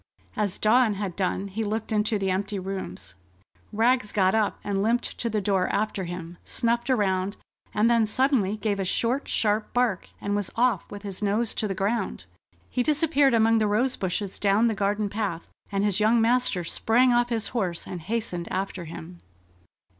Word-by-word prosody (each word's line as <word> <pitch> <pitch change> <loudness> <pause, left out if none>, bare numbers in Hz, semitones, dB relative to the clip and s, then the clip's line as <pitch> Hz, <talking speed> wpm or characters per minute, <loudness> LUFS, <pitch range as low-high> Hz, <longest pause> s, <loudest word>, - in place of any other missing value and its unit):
As 205 -3 -1
Dawn 220 0 +3
had 195 -3 -4
done, 195 0 -1
he 205 +3 -3
looked 220 +1 -3
into 210 0 +1
the 195 -1 0
empty 200 +2 -2
rooms. 185 - -6 0.6
Rags 225 0 +2
got 190 -2 +3
up 220 -2 +1
and 200 -1 -1
limped 235 +4 0
to 235 - -1
the 215 -1 -1
door 190 -2 +1
after 200 -2 -1
him, 175 0 -7
snuffed 235 +2 0
around, 195 -5 +1 0.3
and 215 +2 +2
then 230 -2 +3
suddenly 220 -4 +1
gave 210 -2 -1
a - - 0
short, 240 +8 0
sharp 215 0 +1
bark, 245 -7 +1
and 205 0 -2
was 205 -3 -1
off 235 -5 +1
with 205 0 -9
his 200 -1 -6
nose 210 +3 0
to 215 - -1
the 195 - -3
ground. 205 +5 -2 0.4
He 250 - -1
disappeared 290 -2 +3
among 225 0 +4
the 215 - +2
rose 245 +5 +1
bushes 190 +1 -3
down 205 +3 +3
the 230 - +2
garden 205 +1 0
path, 200 -5 -3 0.2
and 195 0 0
his 205 -1 +1
young 220 +2 +4
master 230 -5 +2
sprang 240 +8 +3
off 240 0 +2
his 225 -2 -1
horse 185 -8 -2
and 180 - -6
hastened 180 -3 -3
after 190 -1 -3
him. 170 +2 -9
210 Hz, 185 wpm, -26 LUFS, 195-230 Hz, 0.6 s, among